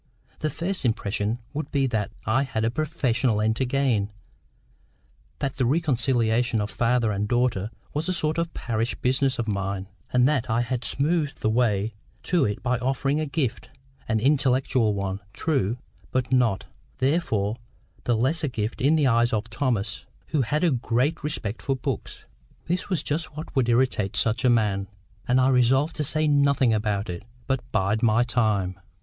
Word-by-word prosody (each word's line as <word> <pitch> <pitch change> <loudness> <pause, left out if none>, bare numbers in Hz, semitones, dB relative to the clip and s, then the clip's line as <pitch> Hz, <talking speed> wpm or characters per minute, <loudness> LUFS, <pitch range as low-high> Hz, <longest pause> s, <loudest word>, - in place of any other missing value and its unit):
The 155 - 0
first 180 +5 -3
impression 110 -2 0 0.2
would 155 +2 -4
be 140 -1 +1
that 110 -5 -1 0.2
I 110 +5 +2
had 115 -5 -1
a 115 - +1
PROFESSIONAL 130 -6 0
end 110 +1 +2
to 130 - +1
gain, 125 -6 +1 1.3
that 135 -1 -3
the 130 - +2
reconciling 125 -6 +2
of 105 +1 -2
father 120 -2 +1
and 100 +1 -1
daughter 120 -4 +1 0.2
was 155 +5 -1
a - - +2
sort 155 -1 0
of 170 0 -1
parish 115 0 -1
business 130 +1 +1
of 115 - -2
mine, 100 -1 -2 0.2
and 125 0 +4
that 135 -4 0
I 115 +2 +2
had 120 0 -2
smoothed 150 +1 0
the 110 - +2
way 110 -3 +1 0.3
to 170 -6 +2
it 105 -1 -3
by 125 -1 +1
offering 135 +3 0
a 155 - -1
gift—an 130 -4 -3
intellectual 130 -4 +2
one, 100 0 -2
true, 125 -8 0 0.3
but 130 0 -1
not, 120 -6 +2 0.3
therefore, 120 - 0 0.5
the 120 -2 +2
less 145 +8 +1
a - - +2
gift 115 0 -3
in 145 +5 +4
the 150 -3 +3
eyes 120 -1 +3
of 110 0 -2
Thomas, 115 -4 -1 0.2
who 150 - +1
had 150 +7 0
a 170 - +4
great 125 +5 0
respect 120 -8 -3
for 135 - 0
books. 130 -3 -5 0.4
This 180 +4 -2
was 180 -5 0
just 150 0 -3
what 155 - -7
would 125 -3 +2
irritate 115 -5 +1
such 115 +3 +2
a 130 - +5
man, 105 -4 +2 0.4
and 125 +1 +3
I 130 +1 +4
resolved 135 +4 +3
to 150 - 0
say 155 +2 +1
nothing 140 -4 +3
about 105 -1 0
it, 85 -3 -5 0.2
but 135 -2 0
bide 100 +3 +1
my 115 0 +4
time. 105 -6 0
125 Hz, 175 wpm, -25 LUFS, 110-140 Hz, 1.3 s, a